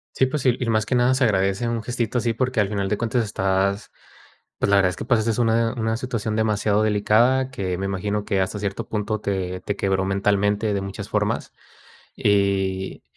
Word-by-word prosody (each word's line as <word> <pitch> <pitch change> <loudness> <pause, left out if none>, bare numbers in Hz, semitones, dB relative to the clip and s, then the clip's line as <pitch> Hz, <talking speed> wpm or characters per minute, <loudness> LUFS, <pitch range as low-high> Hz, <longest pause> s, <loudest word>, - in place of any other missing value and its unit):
Sí, 130 - +3
pues, 135 +1 -3
sí, 125 -2 +3
y 125 - -2
más 110 -1 +1
que 125 - 0
nada 125 +1 +3
se 130 - 0
agradece 100 +2 +1
un 115 -1 -2
gestito 120 0 -1
así, 115 -1 0
porque, 130 +1 -1
al 100 - +1
final 100 -2 -2
de 105 - -1
cuentas 115 0 0
estás, 95 0 -1 0.7
pues, - - 0
la 100 - +5
verdad 95 -2 +4
es - - -7
que - - -5
pasaste 115 -1 +1
una 115 0 +2
una 110 -1 -1
situación 115 -3 -3
demasiado 105 -1 +1
delicada, 115 +5 +3
que 95 -8 -3
me 95 - -2
imagino 100 +2 -2
que 95 - 0
hasta 95 +2 -1
cierto 100 -1 -4
punto 110 0 -2
te 95 -3 -3
te 100 - -3
quebró 95 -1 0
mentalmente 100 +2 +1
de 100 - 0
muchas 100 0 -6
formas. - - -1 0.6
Y 95 -2 0
105 Hz, 200 wpm, -23 LUFS, 100-115 Hz, 0.7 s, la